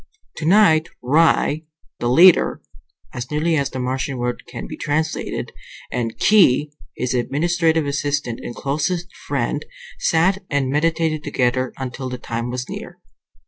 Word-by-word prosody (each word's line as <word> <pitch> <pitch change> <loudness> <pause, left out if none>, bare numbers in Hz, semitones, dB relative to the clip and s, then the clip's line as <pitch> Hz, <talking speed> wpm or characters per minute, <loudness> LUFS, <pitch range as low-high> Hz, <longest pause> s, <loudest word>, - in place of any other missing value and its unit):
Tonight 165 -2 +4
Ry, 155 +2 +3 0.4
the 120 - 0
leader 170 +7 +6 0.5
(as 120 +1 -5
nearly 155 +2 +1
as 140 -3 0
the 130 - -7
Martian 130 +1 -2
word 120 0 -3
can 125 0 -7
be - - -7
translated), 155 +2 -2 0.4
and 115 -2 -3
Khee, 150 -9 +4 0.3
his 125 0 -1
administrative 160 +5 +1
assistant 140 -4 -2
and 120 - -7
closest 165 +5 -2
friend, - - -1 0.4
sat 190 - +2
and 140 -3 0
meditated 160 +1 0
together 130 -1 0
until 130 0 -5
the 125 - -5
time 115 0 -4
was 125 0 -4
near. - - -8
145 Hz, 135 wpm, -21 LUFS, 125-160 Hz, 0.5 s, leader